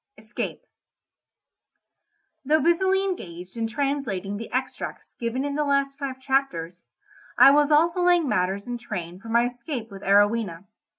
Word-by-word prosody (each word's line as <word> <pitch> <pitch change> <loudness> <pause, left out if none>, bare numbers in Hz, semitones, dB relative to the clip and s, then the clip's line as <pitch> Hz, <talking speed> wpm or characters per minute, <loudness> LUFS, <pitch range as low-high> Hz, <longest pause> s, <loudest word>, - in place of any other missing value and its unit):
ESCAPE 215 0 -6 1.8
Though 305 +3 +3
busily 375 +5 +2
engaged 180 - -6
in 225 -1 -1
translating 225 -6 -2
the 230 - -8
extracts 260 +1 -4
given 240 +3 -2
in 285 - -2
the 300 +1 0
last 275 -1 0
five 265 -2 -4
chapters, 260 - -2 0.5
I 275 - +9
was 295 0 +4
also 335 +4 +3
laying 350 -3 +4
matters 190 -2 0
in 245 -1 -4
train 180 -6 -6
for 225 +3 -11
my 235 +1 +3
escape 245 -1 -5
with 195 -1 -9
Arowhena. 205 -3 +2
245 Hz, 140 wpm, -25 LUFS, 200-285 Hz, 1.8 s, I